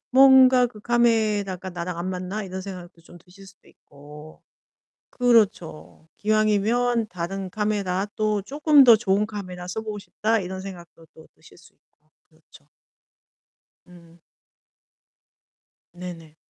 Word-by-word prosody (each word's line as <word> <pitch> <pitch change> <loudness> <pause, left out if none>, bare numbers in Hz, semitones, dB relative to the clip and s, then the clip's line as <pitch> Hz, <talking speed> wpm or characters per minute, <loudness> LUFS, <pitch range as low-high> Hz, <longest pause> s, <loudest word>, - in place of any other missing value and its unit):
'뭔가 260 -1 +6
그 215 -3 -14
카메라가 215 -6 0
나랑 175 0 -6
안 185 +2 -4
맞나?' 185 +3 -5
이런 190 -1 -7
생각도 180 -3 -10
좀 175 +1 -16
드실 190 +3 -18
수도 195 +1 -20
있고. 150 +2 -16 0.7
그렇죠. 210 -10 0
기왕이면 215 +2 +1
다른 185 +2 -6
카메라 200 -2 -2
또 215 -2 -1
'쪼끔 290 +5 +4
더 235 -3 +8
좋은 205 -1 0
카메라 185 -4 -8
써보고 215 +2 -5
싶다.' 220 +3 -1
이런 185 0 -6
생각도 175 -4 -12
또 160 - -17
드실 - - -20
수 - - -20
있고. 155 +1 -45 0.2
그렇죠. 155 -2 -22 1.2
음. 170 -1 -18 1.7
네네. 170 -3 -10
195 Hz, 245 characters per minute, -23 LUFS, 175-215 Hz, 1.7 s, 더